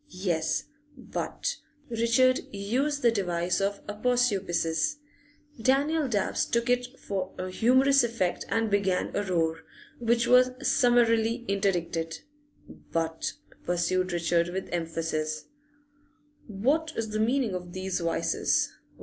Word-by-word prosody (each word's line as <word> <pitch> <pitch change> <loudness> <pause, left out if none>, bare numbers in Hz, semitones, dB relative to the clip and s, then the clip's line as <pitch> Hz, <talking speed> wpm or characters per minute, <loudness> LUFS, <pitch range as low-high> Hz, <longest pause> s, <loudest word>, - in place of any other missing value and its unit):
Yes, 160 -3 0 0.3
but - - -4 0.3
Richard 235 +2 +3
used 255 +9 -1
the 235 - +6
device 180 -4 0
of 200 +1 -2
aposiopesis; 205 - 0 0.7
Daniel 285 +5 +2
Dabbs 205 -5 0
took 235 +1 +1
it 250 +1 -1
for 190 -2 -4
a 185 0 -4
humorous 260 +6 +4
effect 230 -7 -1
and 225 -1 0
began 195 -2 +1
a - - +1
roar, 165 -4 0 0.4
which 235 0 +2
was 255 0 +5
summarily 235 -2 +3
interdicted. 175 -5 -1 0.5
'But,' 165 -1 -3 0.3
pursued 185 +1 0
Richard 170 0 +1
with 190 +2 -4
emphasis, 160 -2 -2 1.0
'what 275 +10 0
is 220 -1 -3
the 215 - -2
meaning 235 -1 +1
of 180 -1 -6
these 185 0 -2
vices? 170 -1 0
200 Hz, 115 wpm, -28 LUFS, 175-245 Hz, 1.0 s, the